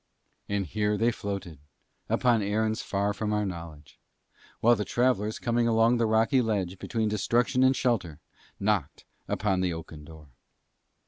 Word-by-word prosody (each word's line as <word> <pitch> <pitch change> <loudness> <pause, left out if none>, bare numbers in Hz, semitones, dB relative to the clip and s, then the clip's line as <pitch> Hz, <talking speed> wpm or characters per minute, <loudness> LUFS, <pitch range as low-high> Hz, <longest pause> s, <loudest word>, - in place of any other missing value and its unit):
And 100 -1 -1
here 105 +3 -1
they 115 +3 +2
floated 100 -8 -6 0.5
upon 120 -3 +2
errands 110 +2 0
far 100 +1 -1
from 105 +1 -3
our 105 0 0
knowledge; 85 -5 -8 0.6
while 120 +1 +5
the 105 - -2
travellers 110 -3 0
coming 120 0 0
along 115 +1 +3
the 115 -1 +1
rocky 110 +4 +3
ledge 95 -5 -2
between 110 -2 -1
destruction 120 +5 +1
and 130 +1 +5
shelter, 105 - -1 0.4
knocked 100 -7 -1 0.2
on 95 -2 0
the 90 -2 0
oaken 80 -2 -9
door. 75 -1 -14
105 Hz, 145 wpm, -27 LUFS, 95-115 Hz, 0.6 s, while